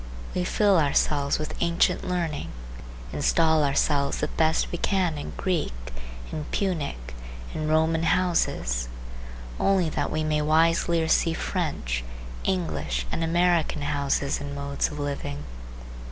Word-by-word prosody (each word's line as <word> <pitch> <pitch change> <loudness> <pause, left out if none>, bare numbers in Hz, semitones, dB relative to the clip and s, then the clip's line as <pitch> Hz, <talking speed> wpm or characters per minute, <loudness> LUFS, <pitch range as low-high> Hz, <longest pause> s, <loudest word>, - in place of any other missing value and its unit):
We 180 - 0
fill 200 -2 +4
ourselves 145 -1 +2
with 155 - -4
ancient 170 0 +2
learning, 170 -5 -2 0.6
install 160 -2 +3
ourselves 140 0 +2
the - - -1
best 160 0 +1
we 175 - -3
can 185 -5 +1
in 145 - -6
Greek, 175 - -1 0.6
in 155 -1 -4
Punic, 145 - -2 0.4
in 155 - -2
Roman 160 +1 +2
houses, 165 - +1 0.7
only 190 -4 +3
that - - -1
we 155 - -1
may 155 -1 +1
wiselier 165 +2 +3
see 165 0 +3
French, - - -2 0.4
English 75 -8 -1
and 165 - -1
American 170 -2 +2
houses 140 -1 0
and 145 0 -5
modes 140 0 -1
of 150 - -7
living. 140 - -4
155 Hz, 125 wpm, -26 LUFS, 140-170 Hz, 0.7 s, fill